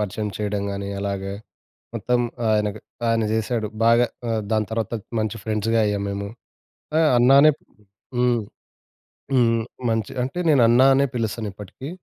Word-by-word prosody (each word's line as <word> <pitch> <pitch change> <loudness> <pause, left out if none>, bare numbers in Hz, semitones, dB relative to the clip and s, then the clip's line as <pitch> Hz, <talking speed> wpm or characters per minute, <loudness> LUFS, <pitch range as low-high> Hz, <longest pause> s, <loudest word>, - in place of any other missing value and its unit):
పరిచయం 105 +1 -2
చేయడం 105 -1 -2
గాని, 100 0 -4
అలాగే 100 -1 -3 0.6
మొత్తం 125 0 0 0.3
ఆయన 105 -1 +2
గా - - -9 0.3
ఆయన 115 -1 +2
చేసాడు. 110 0 -1 0.2
బాగా. 115 +1 +5 0.2
ఆహ్, 110 -1 0
దాని 110 -1 +2
తర్వాత 115 +1 -2 0.3
మంచి 110 +1 -2
ఫ్రెండ్స్‌గా 110 +1 0
అయ్యాము 100 -1 -1
మేము. 100 0 -4 0.7
ఆ! - - +4 0.2
అన్నానే 135 +5 +7
ప్ - - -48 0.6
హ్మ్. 120 -1 +2 1.0
హ్మ్. 115 -2 +3 0.3
మంచి 110 -2 -1
అంటే 135 +7 -4
నేనన్నా 125 -2 +5
అనే 140 +1 +3
పిలుస్తాను 110 -2 -2
ఇప్పటికీ. 105 +7 -9
110 Hz, 140 wpm, -23 LUFS, 105-120 Hz, 1.0 s, అన్నానే